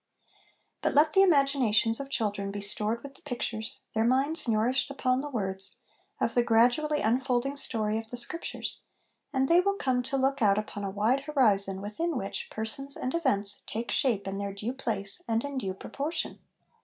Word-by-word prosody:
But - - 0
let 300 +2 +6
the 385 - +6
imaginations 275 - +4
of 275 0 -5
children 205 -6 -1
be 205 +1 -4
stored 210 +3 -1
with 280 -1 -8
the - - -19
pictures, 240 -3 -4
their 220 - +2
minds 270 +6 +1
nourished 235 +5 +2
upon 260 -2 +1
the 295 - -5
words, 195 -6 -1 0.4
of 230 - +1
the 245 - +4
gradually 245 +7 +3
unfolding 255 +3 +1
story 220 -5 -1
of 225 0 -9
the 245 - -5
Scriptures, 335 +8 -2 0.5
and 265 -2 +1
they 340 +3 +6
will 400 +2 +1
come 260 -8 +1
to 265 +2 -2
look 270 +1 +1
out 200 -2 +5
upon 210 -1 -4
a 195 - -1
wide 225 +8 +1
horizon 200 -10 +2
within 265 +10 -2
which 195 -4 -4
persons 275 +6 -3
and 255 - -2
events 210 -12 0
take 230 +2 -3
shape 220 -7 +1
in 195 +1 -3
their 200 -1 -4
due 215 +5 -3
place 215 - -3
and 225 0 +1
in 285 -2 -3
due 190 -6 -3
proportion. 290 - -3
240 Hz, 180 wpm, -29 LUFS, 210-275 Hz, 0.5 s, let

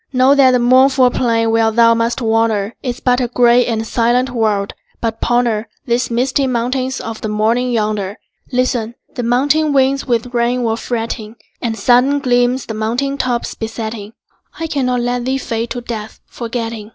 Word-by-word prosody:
Know 260 +1 +4
that 275 -2 +5
the 255 - +3
mournful 255 +1 +4
plain 230 -2 +1
where 225 0 +3
thou 230 +1 +4
must 230 +2 -1
wander 225 -2 +1
Is 250 -1 -4
but 250 0 +1
a 245 - 0
gray 245 0 +3
and 225 -2 -1
silent 245 +3 +1
world, 215 -4 0 0.3
but 225 -1 -3
ponder 235 -2 +1 0.2
The 240 +1 0
misty 260 +3 0
mountains 255 +2 -1
of 225 -1 -6
the 215 - -3
morning 225 +4 +1
yonder. 210 -3 -1 0.3
Listen: 245 -2 -1 0.2
the - - -4
mountain 285 +6 +2
winds 275 0 +2
with 240 0 -1
rain 240 +1 +1
were 225 -1 0
fretting, 225 -1 -4 0.3
And 225 -2 -2
sudden 250 +6 +3
gleams 245 -1 +1
the 220 - -5
mountain 245 +6 -2
tops 245 -2 -1
besetting. 220 -1 -6 0.5
I 330 - -2
cannot 255 -5 -1
let 245 0 -2
thee 265 +1 0
fade 230 -3 -3
to 245 - -4
death, 220 -2 -7
forgetting. 230 -2 -5
240 Hz, 170 wpm, -16 LUFS, 225-255 Hz, 0.5 s, that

